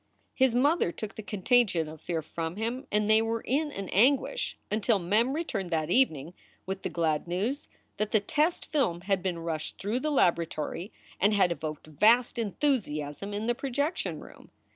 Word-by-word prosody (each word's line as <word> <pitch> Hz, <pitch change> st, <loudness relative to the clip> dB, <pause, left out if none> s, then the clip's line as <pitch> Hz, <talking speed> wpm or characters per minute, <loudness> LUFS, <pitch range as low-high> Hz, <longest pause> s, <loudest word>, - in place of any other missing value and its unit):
His 260 Hz, -3 st, +3 dB
mother 285 Hz, -, +3 dB
took 215 Hz, +4 st, -6 dB
the -, -, -7 dB
contagion 205 Hz, -5 st, +2 dB
of 155 Hz, 0 st, -10 dB
fear 165 Hz, -2 st, -2 dB
from 165 Hz, +2 st, -4 dB
him, 235 Hz, +5 st, -3 dB
and 210 Hz, 0 st, +2 dB
they 220 Hz, +1 st, +5 dB
were 225 Hz, 0 st, -1 dB
in 295 Hz, +4 st, 0 dB
an 195 Hz, -7 st, -5 dB
anguish 270 Hz, -, +2 dB
until 215 Hz, +1 st, +2 dB
Mem 210 Hz, +8 st, +1 dB
returned 225 Hz, -, -3 dB
that 160 Hz, 0 st, -1 dB
evening 170 Hz, -, +2 dB, 0.3 s
with 190 Hz, 0 st, -4 dB
the -, -, -3 dB
glad 160 Hz, -2 st, 0 dB
news 215 Hz, -, -2 dB, 0.3 s
that 215 Hz, 0 st, -1 dB
the 215 Hz, -, +4 dB
test 310 Hz, -, 0 dB
film 180 Hz, -, 0 dB
had 195 Hz, 0 st, 0 dB
been 180 Hz, -2 st, -2 dB
rushed 165 Hz, -2 st, -4 dB
through 210 Hz, +5 st, -1 dB
the 305 Hz, -, -1 dB
laboratory 170 Hz, -, 0 dB, 0.3 s
and 205 Hz, +2 st, +3 dB
had 190 Hz, -3 st, +4 dB
evoked 155 Hz, -2 st, -5 dB
vast 225 Hz, -, +3 dB
enthusiasm 200 Hz, -, -1 dB
in 205 Hz, +2 st, -3 dB
the 240 Hz, -, +2 dB
pro 270 Hz, +2 st, -5 dB
jection 285 Hz, +7 st, -1 dB
room. -, -, -15 dB
205 Hz, 180 wpm, -29 LUFS, 170-250 Hz, 0.3 s, they